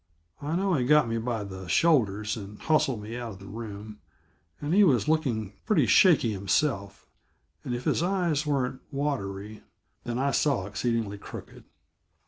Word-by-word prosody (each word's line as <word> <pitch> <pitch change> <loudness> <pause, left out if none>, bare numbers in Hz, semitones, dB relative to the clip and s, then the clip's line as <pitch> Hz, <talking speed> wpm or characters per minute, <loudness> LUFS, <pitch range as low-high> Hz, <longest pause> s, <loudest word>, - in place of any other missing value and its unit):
I 150 +3 -2
know 190 +1 +1
he 135 -6 +2
got 150 0 +4
me 115 0 -1
by 115 -2 -2
the 95 -2 -8
shoulders 105 - +2
and 105 -1 -8
hustled 135 -8 +1
me 110 +3 -6
out 120 -3 -5
of 95 - -13
the 95 - -12
room, 105 0 -8 0.6
and 150 +3 -2
he 205 +2 +6
was 130 - +3
looking 125 - 0
pretty 165 - +4
shaky 150 - +5
himself; 100 0 -1 0.6
and 125 - -3
if 120 - -5
his - - +1
eyes 175 -5 +1
weren't 135 -3 -1
watery, 110 -8 -3 0.4
then 120 0 -3
I 140 +2 +1
saw 135 -9 +1
exceedingly, 105 0 -2
crooked. - - -10
120 Hz, 160 wpm, -27 LUFS, 105-150 Hz, 0.6 s, he